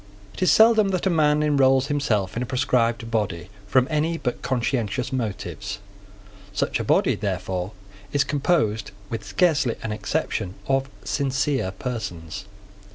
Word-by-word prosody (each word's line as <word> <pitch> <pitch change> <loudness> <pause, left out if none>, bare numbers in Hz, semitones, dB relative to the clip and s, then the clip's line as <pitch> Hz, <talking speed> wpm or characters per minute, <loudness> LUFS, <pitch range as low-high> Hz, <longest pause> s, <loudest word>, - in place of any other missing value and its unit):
It - - -10
is 185 - +5
seldom 220 -2 +6
that 185 -2 -1
a 190 - +3
man 150 -2 +3
enrolls 135 -3 +4
himself 110 -10 0
in 120 - -1
a - - -1
proscribed 120 -2 +1
body 95 -6 -1 0.2
from 130 +4 +3
any 155 +2 +1
but 125 -6 -3
conscientious 125 -1 -1
motives. 105 -3 -3 0.8
Such - - 0
a - - -1
body, - - +3
therefore, 95 -1 -3 0.4
is 145 0 +3
composed, 140 -7 +1 0.2
with 115 -2 -3
scarcely 135 - +2
an 110 - -3
exception, 105 - -2
of 135 0 +1
sincere 135 -5 0
persons. 95 - -5
125 Hz, 140 wpm, -24 LUFS, 105-145 Hz, 0.8 s, seldom